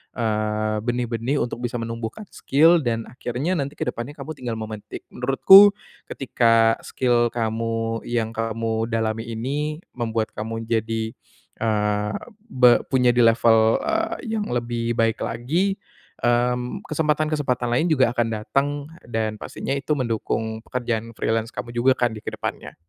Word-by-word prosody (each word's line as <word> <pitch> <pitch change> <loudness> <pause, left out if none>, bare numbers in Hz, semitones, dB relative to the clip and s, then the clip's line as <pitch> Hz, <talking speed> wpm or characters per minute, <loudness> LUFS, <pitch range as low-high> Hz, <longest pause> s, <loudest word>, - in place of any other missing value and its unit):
eee, 110 -1 -1
benih-benih 120 +2 -1
untuk 120 0 -5
bisa 120 -1 -3
menumbuhkan 115 - -5
skill 165 +5 +4
dan 115 -5 -1
akhirnya 125 +8 -2
nanti 140 +1 -3
kedepannya 125 +3 -4
kamu 150 +1 -7
tinggal 120 -3 -4
memetik, 110 -1 -7
menurutku, 190 +11 +7 0.3
ketika 115 -3 +3
skill 120 -2 +2
kamu 115 0 -1
yang 115 -2 -1
kamu 115 0 -2
dalami 115 0 -2
ini 145 +7 -3
membuat 115 -2 -2
kamu 115 +1 -5
jadi, 110 0 -1 0.5
eee, 105 -1 0 0.3
be 125 - +5
punya 125 -2 +3
di 120 - 0
level, 115 -1 +4
eee, 330 0 -1 0.2
yang 210 - -2
lebih 120 -1 -2
baik 115 +1 +1
lagi, 170 +12 -1 0.5
mmm, 125 +1 +1
kesempatan-kesempatan 150 -5 0
lain 160 +7 +2
juga 130 -6 +4
akan 120 -1 +1
datang, 110 +6 0 0.4
dan 110 -2 -2
pastinya 135 +5 -4
itu 140 +2 -4
mendukung 110 -1 -2
pekerjaan 115 -2 -3
freelance 115 0 -1
kamu 120 0 -7
juga 120 +3 +4
kan 120 -2 0
di 110 - -10
kedepannya. - - -5
120 Hz, 135 wpm, -23 LUFS, 115-130 Hz, 0.5 s, menurutku